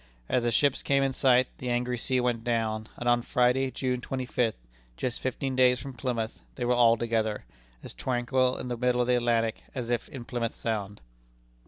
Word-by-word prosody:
As 125 - +2
the 120 - +1
ships 140 +4 +2
came 140 0 +2
in 135 -1 0
sight, 130 -1 +4
the 125 - -4
angry 125 +1 0
sea 130 +2 +1
went 120 -2 0
down; 110 -2 -1
and 120 - -4
on 120 0 +4
Friday, 125 +2 +2
June 125 0 -2
twenty 130 0 -3
fifth, 120 -2 0 0.4
just 125 -2 -3
fifteen 130 +1 -2
days 125 -1 +4
from 135 0 -7
Plymouth, 120 -2 -3 0.2
they 120 - -2
were 125 - +3
all 120 -1 +5
together, 110 - -1 0.4
as - - -2
tranquil 130 0 0
in - - -5
the 120 -1 -3
middle 125 0 +2
of - - +2
the 125 0 +3
Atlantic 115 -2 +1
as 120 -2 -3
if 120 - -1
in 125 -4 -8
Plymouth 120 -2 -3
Sound. 105 -3 -3
125 Hz, 200 wpm, -28 LUFS, 115-130 Hz, 0.4 s, all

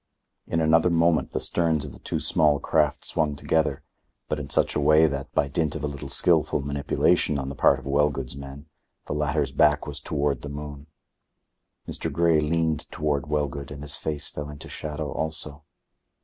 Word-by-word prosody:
In 80 - 0
another 80 +2 +4
moment 85 -1 +2
the - - -2
sterns 80 -4 +2
of 70 - -9
the - - -13
two - - -3
small 75 -2 +3
craft 75 -2 +1
swung 75 -3 0
together, 75 -1 0 0.5
but 75 - -1
in 70 -1 -6
such - - +1
a - - +1
way 75 +2 +5
that, 70 -3 -3
by 70 - +2
dint 75 +2 -1
of 80 - -5
a - - 0
little 70 -1 -7
skilful - - +3
manipulation 70 +1 +1
on 65 -1 -3
the 70 - -6
part 70 - +4
of 65 - -12
Wellgood's 70 -2 0
men, 70 +1 -9 0.4
the - - -4
latter's 75 0 0
back 75 -1 +3
was 75 -1 -5
toward 75 -1 -1
the 75 - -6
moon. 70 0 -8 1.0
Mr. - - -3
Grey 85 -2 +3
leaned 80 -1 0
toward 75 -3 -2
Wellgood, 70 -2 -2
and 70 -1 -8
his 75 - -2
face 75 -2 0
fell 75 0 -6
into 75 -1 -9
shadow 75 -1 -5
also. 75 -1 -3
75 Hz, 185 wpm, -25 LUFS, 70-80 Hz, 1.0 s, way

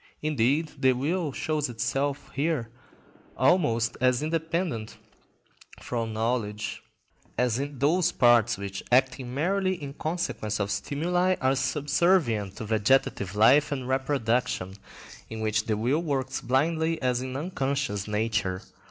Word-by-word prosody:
Indeed, 150 +2 +1
the 130 -1 +5
will 155 +5 -1
shows 150 0 -2
itself 135 +4 -2
here 140 -6 -1 0.7
almost 130 -6 +2
as 125 +1 +3
independent 160 -6 -2 0.8
of 115 -2 -3
knowledge, 110 -1 -2 0.6
as 125 -1 +1
in 140 0 -4
those 165 +6 +2
parts 120 -1 +4
which, 100 -1 -5
acting 130 0 +2
merely 185 +7 0
in 145 -5 -7
consequence 155 - -3
of 100 0 -1
stimuli, 175 - 0
are 130 +1 +2
subservient 140 - +1
to 115 - -6
vegetative 105 -3 +1
life 135 +9 +5
and 130 -3 -3
reproduction, 125 -7 0 0.6
in 110 - -6
which 110 0 0
the 110 -2 0
will 130 +9 +1
works 135 -5 -2
blindly 160 +6 +1
as 125 -1 0
in 130 0 -5
unconscious 140 - -2
nature. 105 -3 -1
130 Hz, 125 wpm, -27 LUFS, 115-150 Hz, 0.8 s, the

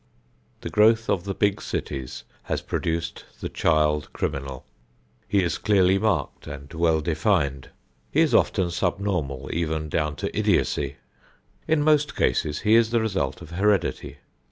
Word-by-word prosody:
The - - -6
growth 110 +1 +4
of 90 -2 -1
the 100 -1 -3
big 100 -1 +1
cities 65 -2 -5 0.2
has - - -2
produced 85 0 -3 0.2
the - - -4
child 75 -2 +1
criminal. 70 -1 -4 0.6
He 100 -2 +2
is 85 -3 -1
clearly 95 -2 +3
marked 110 0 -1
and 70 +2 -9
well 80 -1 +2
defined. 75 -5 0 0.4
He - - +3
is - - +2
often 90 -2 +2
subnormal 85 -7 -2
even 80 -2 -2
down 75 -1 -1
to - - -4
idiocy. 70 -1 +1 0.7
In 160 -2 +2
most 150 -1 +3
cases 75 +4 0
he 110 0 +3
is 115 -1 +5
the 115 0 +2
result 95 -12 -2
of - - -12
heredity. 95 0 0
85 Hz, 145 wpm, -24 LUFS, 75-100 Hz, 0.7 s, is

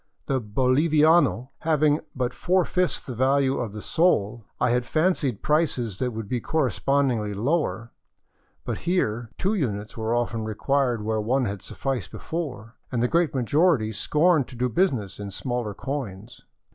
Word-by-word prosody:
The 135 -2 0
boliviano 135 +4 +3
having 155 -1 +2 0.2
but 125 -1 -1
four 185 0 +1
fifths 180 -1 0
the 130 - -6
value 135 +2 +2
of 115 -4 -3
the 105 0 -8
sol, 120 - +1 0.2
I 125 - +2
had 125 0 +2
fancied 155 - 0
prices 130 - 0
would 115 -4 -2
be 120 +2 -2
correspondingly 130 -6 0
lower; 120 -1 -1 0.7
but - - -3
here 120 - 0
two 195 +4 0
units 105 - -2
were 110 +1 -1
often 115 -2 -1
required 120 +1 0
where 110 0 0
one 125 +4 +1
had 100 -2 -4
sufficed 125 -9 -4
before, 125 - -6
and 120 -2 0
the - - +3
great 165 0 +1
majority 135 - +2
scorned 150 - +2
to - - -11
do 125 +1 0
business 115 - 0
in 100 -1 -5
smaller 120 0 -3
coins. 120 -5 -6
125 Hz, 150 wpm, -25 LUFS, 110-150 Hz, 0.7 s, boliviano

